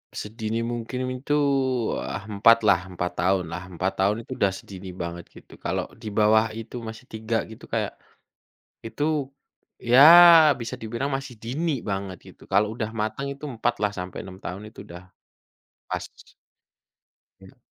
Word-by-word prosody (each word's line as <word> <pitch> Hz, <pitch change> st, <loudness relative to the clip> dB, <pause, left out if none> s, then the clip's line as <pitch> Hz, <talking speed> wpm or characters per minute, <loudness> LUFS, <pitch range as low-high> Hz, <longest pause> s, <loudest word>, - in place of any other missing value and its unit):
Sedini 110 Hz, +1 st, -3 dB
mungkin 120 Hz, +2 st, -4 dB, 0.2 s
itu 145 Hz, +2 st, -2 dB, 0.7 s
ah, 100 Hz, -, -5 dB
4 115 Hz, +3 st, +5 dB
lah, 95 Hz, -3 st, +3 dB
4 90 Hz, -1 st, -3 dB
tahun 95 Hz, -1 st, +2 dB
lah, 90 Hz, +2 st, -6 dB
4 95 Hz, +1 st, -2 dB
tahun 100 Hz, +2 st, +3 dB
itu -, -, -16 dB
udah 100 Hz, -1 st, +3 dB
sedini 95 Hz, -2 st, -10 dB
banget 85 Hz, -1 st, -6 dB
gitu. -, -, -15 dB
Kalau -, -, -2 dB, 0.2 s
di -, -, -8 dB
bawah 110 Hz, +1 st, +3 dB
itu 115 Hz, +2 st, -7 dB
masih 110 Hz, +1 st, -8 dB
3 110 Hz, +1 st, -2 dB
gitu, 110 Hz, -, -12 dB
kayak, -, -, -2 dB, 1.0 s
itu, 115 Hz, +6 st, -6 dB, 0.8 s
ya 120 Hz, +2 st, +4 dB, 0.6 s
bisa 120 Hz, +1 st, -6 dB
dibilang 120 Hz, +5 st, -3 dB
masih 135 Hz, -2 st, -4 dB
dini 140 Hz, +3 st, -2 dB
banget 95 Hz, -2 st, -4 dB
gitu, -, -, -16 dB
kalau 105 Hz, +2 st, +2 dB
udah 110 Hz, 0 st, -4 dB
mateng 110 Hz, +6 st, -3 dB
itu 140 Hz, -, -12 dB
4 120 Hz, 0 st, -1 dB
lah 105 Hz, -, +2 dB
sampai 90 Hz, 0 st, -6 dB
6 95 Hz, 0 st, -10 dB
tahun 95 Hz, +2 st, -7 dB
itu -, -, -12 dB
udah 85 Hz, +1 st, -10 dB, 0.8 s
pas. -, -, -3 dB, 1.4 s
Ya. -, -, -17 dB
110 Hz, 155 wpm, -25 LUFS, 95-120 Hz, 1.4 s, 4